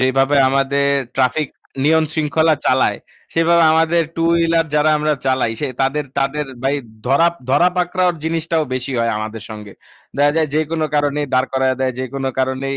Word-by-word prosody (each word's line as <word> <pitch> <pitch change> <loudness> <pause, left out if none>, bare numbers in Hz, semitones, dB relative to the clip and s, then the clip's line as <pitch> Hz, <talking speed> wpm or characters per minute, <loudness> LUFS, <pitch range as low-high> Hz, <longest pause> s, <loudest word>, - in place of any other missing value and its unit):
যেভাবে 135 +2 +2
আমাদের 140 +1 +1 0.3
traffic 135 +3 +1 0.4
নিয়ম 160 +1 +4
শৃঙ্খলা 160 +1 +2
চালায়, 130 0 +2 0.4
সেভাবে 165 +1 +3
আমাদের 165 +1 +2
2 165 0 +1
wheeler 165 -1 +2
যারা 150 +1 +3
আমরা 150 0 +1
চালাই 130 -3 +1
সে 145 - -1
তাদের 135 +3 0
তাদের 140 +2 -1 0.2
ভাই 135 +1 +1 0.3
ধরা 140 +6 +4 0.2
ধরা 170 +6 +4
পাকড়াওর 180 0 +1
জিনিসটাও 165 0 -1
বেশি 130 +1 -4
হয় 115 0 +1
আমাদের 110 0 -6
সঙ্গে। 105 -2 -9 0.4
দেখা 145 +1 +3
যায় 160 -1 +1
যেকোনো 155 +1 0
কারণেই 145 0 0
দাঁড় 130 +1 +2
করায়া 130 0 +1
দেয়, 130 -1 0
যেকোনো 135 +1 -3
কারণেই 130 +1 -1
145 Hz, 160 wpm, -18 LUFS, 130-160 Hz, 0.4 s, নিয়ম